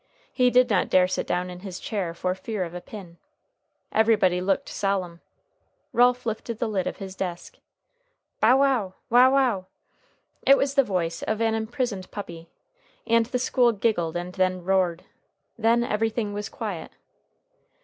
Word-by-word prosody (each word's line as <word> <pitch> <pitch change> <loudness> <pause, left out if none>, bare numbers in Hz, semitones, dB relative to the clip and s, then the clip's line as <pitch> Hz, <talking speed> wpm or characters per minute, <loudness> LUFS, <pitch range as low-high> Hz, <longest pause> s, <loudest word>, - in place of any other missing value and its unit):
He 250 -1 +3
did 250 0 +4
not 205 -6 +1
dare 180 0 +4
sit 185 - -3
down 180 0 -1
in 180 - -9
his 185 -1 -7
chair 185 -6 -3
for 180 +1 -1
fear 190 +1 -4
of 170 -1 -7
a 180 - -6
pin. 180 -4 -11 0.7
Everybody 210 -5 +3
looked 190 +1 0
solemn. 185 -4 -2 0.7
Ralph 245 +1 +3
lifted 225 0 -4
the 235 - -1
lid 195 -4 -1
of - - -4
his 190 -2 -7
desk. 190 - -6 0.8
"Bow 245 +4 +5
wow! 255 -9 +1 0.2
wow 250 +2 +7
wow!" 250 -9 +2 0.8
It 275 - +6
was 275 0 0
the 275 -1 +4
voice 170 -6 -2
of 220 0 -2
an 225 -1 +1
imprisoned 220 -3 -3
puppy, 170 -5 -8 0.6
and 230 -1 +3
the 250 - -1
school 245 -1 +2
giggled 195 -6 0
and 175 +1 -5
then 185 -1 0
roared. 180 -2 +1 0.5
Then 230 +1 +2
everything 220 -1 -1
was 205 0 -4
quiet. - - -6
205 Hz, 160 wpm, -25 LUFS, 185-235 Hz, 0.8 s, wow